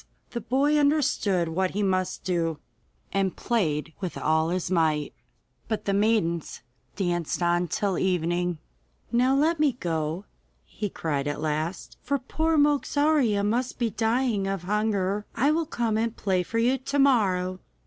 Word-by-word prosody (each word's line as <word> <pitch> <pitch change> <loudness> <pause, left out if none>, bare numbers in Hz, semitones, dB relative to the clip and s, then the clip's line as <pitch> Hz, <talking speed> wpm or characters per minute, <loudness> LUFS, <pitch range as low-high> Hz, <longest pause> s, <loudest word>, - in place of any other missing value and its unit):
The 235 - -4
boy 280 +7 +2
understood 270 - +2
what 185 +3 -1
he 210 - +1
must 185 -1 -1
do, 165 -3 -1 0.6
and 195 -2 0
played 165 -9 -1
with 185 -3 -4
all 160 +1 +1
his 180 +1 -2
might, 155 -4 +1 0.5
but 220 -1 -3
the 200 - +1
maidens 195 - 0 0.3
danced 175 -3 -1
on 175 +1 +2
till 195 +3 -1
evening. 175 -1 0 0.5
'Now 250 +3 +3
let 310 +3 +2
me 295 -3 +3
go,' 165 -3 -3 0.4
he 210 - -5
cried 145 -5 -2
at 145 - -2
last, 155 +3 -3
'for 280 +2 0
poor 315 +5 0
Mogarzea 290 -6 +2
must 240 +4 -1
be 235 -2 0
dying 225 -2 0
of 195 -2 -3
hunger. 205 0 0
I 275 +6 +3
will 320 0 0
come 230 -7 0
and 230 0 -2
play 190 -3 +1
for 225 +6 -4
you 250 +3 +2
to 275 +2 -3
morrow. 190 -9 +2
200 Hz, 150 wpm, -26 LUFS, 175-245 Hz, 0.6 s, Now